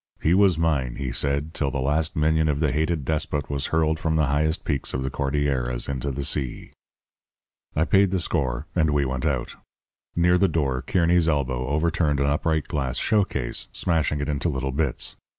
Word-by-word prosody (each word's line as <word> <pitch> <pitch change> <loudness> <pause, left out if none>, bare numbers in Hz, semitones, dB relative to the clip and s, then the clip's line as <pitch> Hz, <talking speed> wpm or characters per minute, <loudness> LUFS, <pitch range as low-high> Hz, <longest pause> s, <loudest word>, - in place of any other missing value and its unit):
He 80 - +2
was 95 -3 +4
mine, 75 -7 0
he 65 -3 -4
said, 70 +5 -1
till 70 - -1
the 70 - -3
last 75 +4 0
minion 80 +1 +2
of 75 -2 0
the 75 -3 +1
hated 80 0 -1
despot 75 -1 -2
was 70 -1 -1
hurled 80 -1 +1
from 80 0 0
the 75 -1 +3
highest 75 +3 0
peaks 70 -5 -2
of 65 - -2
the 65 - -3
Cordilleras 70 -3 -1
into 70 0 -3
the 70 +1 -3
sea. 65 -3 -2 1.0
"I 80 - +2
paid 95 +5 +4
the 95 0 0
score, 65 -8 -1
and 80 -3 +3
we 75 -1 +1
went 65 -1 -2
out. - - -2 0.6
Near 90 +1 +3
the 100 - +4
door 70 -6 0
Kearny's 85 -1 +2
elbow 65 -4 -1
overturned 75 0 +1
an 70 - +2
upright 75 +2 0
glass 65 -4 -2
showcase, 95 - 0
smashing 80 -4 0
it 70 - -2
into 75 +3 -1
little 65 -2 -2
bits. 70 -1 -2
75 Hz, 185 wpm, -24 LUFS, 70-80 Hz, 1.0 s, was